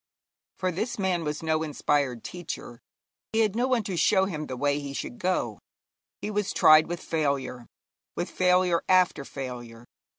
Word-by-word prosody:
For 185 -1 0
this 215 +8 -3
man 185 -4 0
was 150 +1 -3
no 160 0 +1
inspired 145 -5 0
teacher. 175 -8 -7 0.5
He 225 - +3
had 215 -2 +1
no 245 +2 +1
one 250 -4 +1
to 190 -2 -3
show 190 +3 +4
him 155 -6 -4
the 130 - -5
way 145 +2 +1
he 140 -1 -6
should 235 - -5
go; 185 -1 -1 0.6
he 210 - -3
was 205 -1 -1
tried 155 0 +7
with 175 0 -4
failure, 140 -6 -2 0.5
with - - -2
failure 180 -2 +3
after 185 -6 +4
failure. 120 -4 -7
165 Hz, 165 wpm, -27 LUFS, 140-185 Hz, 0.6 s, tried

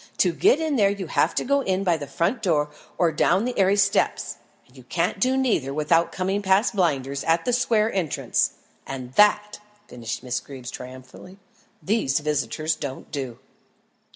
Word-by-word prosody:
To 180 -3 +3
get 270 - +3
in 315 -4 0
there 200 -3 +4
you 200 -1 -4
have - - +1
to - - 0
go 280 +2 +2
in 190 -5 -1
by 175 -3 +2
the 145 -3 -6
front 170 - -1
door 150 -6 +1 0.3
or 170 -2 +3
down 180 +7 +2
the 250 - -2
aiery 195 -1 +3
steps; 200 0 +1 0.3
and - - -25
you - - -13
can't - - -1
do 260 +1 +2
neither 180 - 0
without 165 +2 +2
coming 190 +2 -1
past 200 +4 +2
Blinders 140 -7 0
at 165 +1 +2
the 245 - 0
square's 230 -3 +2
entrance, 175 -6 0 0.3
and 130 -2 -7
that," 210 +2 +3 0.3
finished 120 0 -6
Miss 125 -1 -2
Greeb 135 -3 -11
triumphantly, 130 +9 -11 0.5
"these 195 - +1
visitors 150 +1 -1
don't 140 -3 -7
do." 135 -6 -5
175 Hz, 175 wpm, -24 LUFS, 140-205 Hz, 0.5 s, there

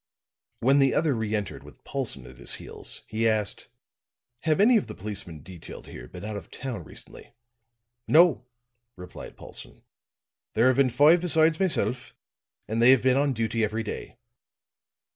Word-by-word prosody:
When 135 +4 +4
the 135 -1 +3
other 155 -2 +2
re 110 -2 -2
entered 105 -2 -4
with - - -16
Paulson 120 - -3
at 60 0 -14
his - - -5
heels, - - -7
he 115 +1 0
asked: 110 -2 -1 0.7
"Have 155 0 +1
any 230 +5 +6
of 215 - +2
the - - -8
policemen 95 -7 -7
detailed 90 -1 -10
here - - -10
been 90 +2 -9
out 105 0 -5
of 100 - -8
town 125 -8 -6
recently?" - - -12 0.7
"No," 160 -5 +5 0.5
replied 90 0 -10
Paulson. - - -9 0.7
"There 115 - +4
have 130 - +2
been 135 -2 +4
five 150 +7 +5
besides 160 -2 +4
myself, 145 -9 -1 0.5
and 110 +2 -1
they 120 - +7
have 130 -2 +6
been 130 -1 +4
on 140 0 +2
duty 115 -1 -1
every 110 +1 -1
day." 105 - -7
120 Hz, 160 wpm, -26 LUFS, 105-145 Hz, 0.7 s, they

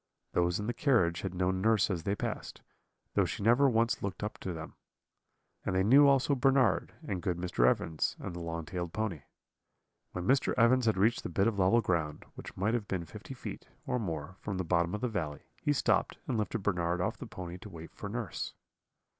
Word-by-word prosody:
"Those 90 +1 +2
in 105 - -3
the 120 - -1
carriage 115 - +2
had 95 -2 -4
known 95 +1 0
nurse 110 -1 +3
as 85 -3 -2
they 100 +5 -1
passed, - - -5 0.5
though - - +3
she - - -4
never 120 +6 +5
once 115 -1 +1
looked 100 0 -4
up 105 - -4
to 95 - -4
them; 80 -2 -7 0.9
and 95 - -1
they 95 - +3
knew 140 +8 +7
also 140 0 +4
Bernard, 135 0 +3
and 95 -3 -2
good 90 0 -1
Mr. 85 -9 +2
Evans, 80 +4 +1
and - - -6
the 85 - -6
long 85 -1 -4
tailed 85 +1 -4
pony. 105 -9 -2 0.9
"When 90 -1 -4
Mr. 135 +5 +3
Evans 120 +1 +4
had 110 - +3
reached 110 +5 +3
the - - -5
bit 100 - +2
of 110 -3 0
level 95 +6 +5
ground, 80 -7 -1
which - - -10
might 105 +4 +1
have 115 -4 -1
been 90 -3 -2
fifty - - -9
feet, - - -7 0.2
or 125 - 0
more, 85 -3 -4
from 100 -3 -4
the 95 - -1
bottom 85 +2 +1
of 105 - -5
the 125 - +1
valley, 80 -10 -3 0.2
he 145 - +1
stopped, 145 - +1
and 130 - 0
lifted 105 -2 -1
Bernard 90 -3 0
off 105 +6 -1
the 130 - -8
pony 90 -4 -7
to 105 - -10
wait 80 -3 -10
for 100 - -6
nurse. 110 -5 -4
95 Hz, 215 wpm, -31 LUFS, 85-115 Hz, 0.9 s, knew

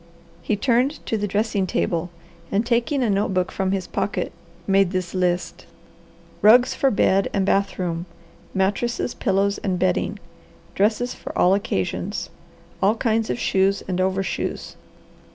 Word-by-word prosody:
He 210 - 0
turned 255 +6 +1
to - - -1
the 205 -1 -1
dressing 205 -1 0
table 175 -1 -1 0.4
and 205 +4 +1
taking 245 +3 +1
a 235 - +1
notebook 195 -2 0
from 190 -1 -1
his 195 -2 -1
pocket 180 -1 -2 0.3
made 195 -1 +3
this 185 -1 -3
list: 180 -1 -1 0.7
Rugs 245 +4 +6
for 275 - +2
bed 195 -3 +2
and 195 -1 +2
bath 200 0 +1
room. 175 -1 -3 0.5
Mattresses, 205 +6 0
pillows 200 -1 0
and 185 -3 -1
bedding, 90 - 0 0.6
Dresses 220 +5 +1
for - - -8
all 180 - +5
occasions. 145 - -2 0.5
All 205 +3 +4
kinds 225 -1 0
of - - -1
shoes 195 -3 +1
and 185 -1 -1
overshoes. 190 +1 -2
195 Hz, 140 wpm, -23 LUFS, 185-220 Hz, 0.7 s, Rugs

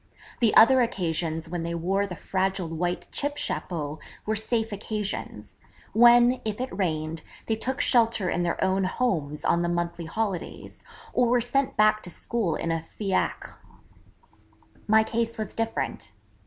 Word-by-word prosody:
The 230 -3 +3
other 255 +3 +7
occasions 165 -7 -1
when 175 +1 -4
they 170 +1 -3
wore 195 +4 0
the 180 - -6
fragile 190 0 -1
white 175 +2 -2
chip 290 0 -1
chapeau 155 -3 -3 0.3
were 215 - 0
safe 225 +1 -1
occasions, 210 0 -5 0.3
when, 240 +2 +6
if 215 0 -3
it 255 -6 -4
rained, 160 -4 -2 0.2
they 225 - 0
took 260 +5 -2
shelter 230 -7 +3
in 175 - 0
their 175 -1 -1
own 190 0 +1
homes 170 - -1
on 170 - +3
the 175 - 0
monthly 175 -1 -2
holidays, 195 +1 -4 0.3
or 245 - +3
were 245 +1 +3
sent 255 +3 0
back 215 0 +4
to 180 - -3
school 190 -2 -1
in 165 - -2
a 165 0 -1
fiacre. 195 +4 -3 1.3
My 220 +1 +5
case 230 +1 -2
was 215 -1 -4
different. 225 - -3
200 Hz, 155 wpm, -26 LUFS, 170-230 Hz, 1.3 s, other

